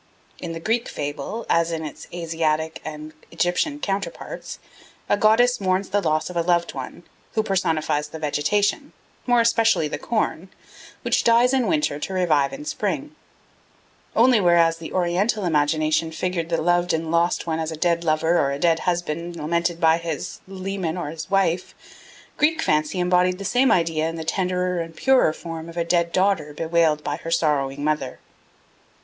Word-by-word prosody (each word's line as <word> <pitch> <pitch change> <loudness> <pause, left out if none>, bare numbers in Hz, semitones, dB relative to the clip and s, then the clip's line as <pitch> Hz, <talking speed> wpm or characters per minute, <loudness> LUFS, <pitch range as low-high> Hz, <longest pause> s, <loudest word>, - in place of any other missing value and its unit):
In 170 -1 -5
the 165 - -5
Greek 225 +7 0
fable, 145 +10 -5
as 170 0 +2
in 160 -1 -3
its 150 - -9
Asiatic 160 -2 -1
and 155 0 -7 0.2
Egyptian 285 - 0
counterparts, 195 -5 -4 0.5
a - - +3
goddess 220 +3 +3
mourns 185 0 0
the 205 - +1
loss 155 -4 0
of 180 - -8
a 170 - +2
loved 170 0 +1
one, - - -7 0.3
who 220 - +2
personifies 160 -6 0
the 155 - -8
vegetation, 155 +7 0 0.3
more 245 -1 +4
especially 230 -7 +3
the - - -5
corn, 195 -5 -2 0.5
which - - +1
dies 235 +2 +4
in 260 -2 +2
winter 300 - 0
to 190 - -4
revive 160 -7 +2
in 295 +2 -8
spring; - - -3 1.0
only 240 -1 +5
whereas 170 -2 +4
the 165 -1 -8
Oriental 185 +4 0
imagination 155 0 +1
figured 170 0 -2
the 165 - 0
loved 175 +1 +2
and 160 0 -2
lost 170 +1 +1
one 160 -1 -2
as 160 0 -2
a 160 - -6
dead 170 +1 +1
lover 160 +2 +2
or 140 - +1
a 140 - -2
dead 165 +2 +2
husband 170 0 -3
lamented 170 +2 -1
by 165 -1 +4
his 165 -3 -5
leman 190 -3 -4
or 160 -4 -4
his 165 +3 -7
wife, 185 -2 0 0.6
Greek 315 +2 +2
fancy 155 +4 +1
embodied 180 0 +2
the 200 - -7
same 250 +4 +3
idea 165 -4 +1
in 165 - -6
the 160 - -5
tenderer 180 +1 -1
and 165 -1 -6
purer 265 -5 +4
form 165 0 -7
of 170 - -11
a 170 - +1
dead 170 0 +1
daughter 185 -6 +1
bewailed 160 -2 +1
by 145 - -2
her 165 - -7
sorrowing 145 -4 0
mother. 150 -4 -1
170 Hz, 170 wpm, -23 LUFS, 160-190 Hz, 1.0 s, only